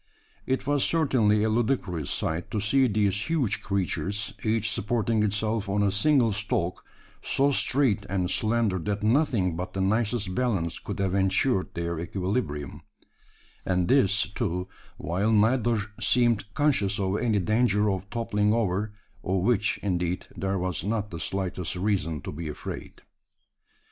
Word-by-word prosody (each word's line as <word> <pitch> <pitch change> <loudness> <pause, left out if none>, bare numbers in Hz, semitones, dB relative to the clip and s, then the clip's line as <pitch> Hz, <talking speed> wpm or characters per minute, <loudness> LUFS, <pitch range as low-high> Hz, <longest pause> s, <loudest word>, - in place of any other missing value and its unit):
It 130 - 0
was 145 -1 +2
certainly 120 -10 +2
a 110 - +2
ludicrous 110 - 0
sight 80 +2 -2
to 105 - -2
see 130 +6 +3
these 100 - 0
huge 150 -10 0
creatures 100 +1 -2
each 110 0 +1
supporting 115 0 0
itself 105 0 0
on 105 +1 +1
a 100 - +2
single 120 +3 +3
stalk, 100 -3 -2 0.4
so 140 +1 +2
straight 130 -7 +1
and 90 -1 0
slender 110 -4 +1
that 105 +4 -3
nothing 110 - +2
but 90 +2 -5
the 95 - -2
nicest 105 0 0
balance 100 -9 0
could - - -6
have 95 -2 0
ensured 95 +3 +1
their 85 -1 -2
equilibrium; 90 - -3 0.8
and 90 -2 0
this, 115 -5 +3
too, 90 -4 -2 0.3
while 95 +7 0
neither 115 +1 +3 0.2
seemed 115 -5 +2
conscious 105 -10 +2
of 95 +1 0
any 115 -4 +1
danger 105 +2 +2
of 95 +1 -4
toppling 105 -3 0
over 105 -2 0 0.3
of 95 -1 0
which, 105 -1 +1
indeed, 90 -2 -1
there 95 0 -1
was 90 -3 -2
not 105 +1 -2
the 85 - -6
slightest 90 +1 -2
reason 90 -6 -1
to - - -6
be 80 +2 -6
afraid. 75 - -7
105 Hz, 145 wpm, -27 LUFS, 95-115 Hz, 0.8 s, see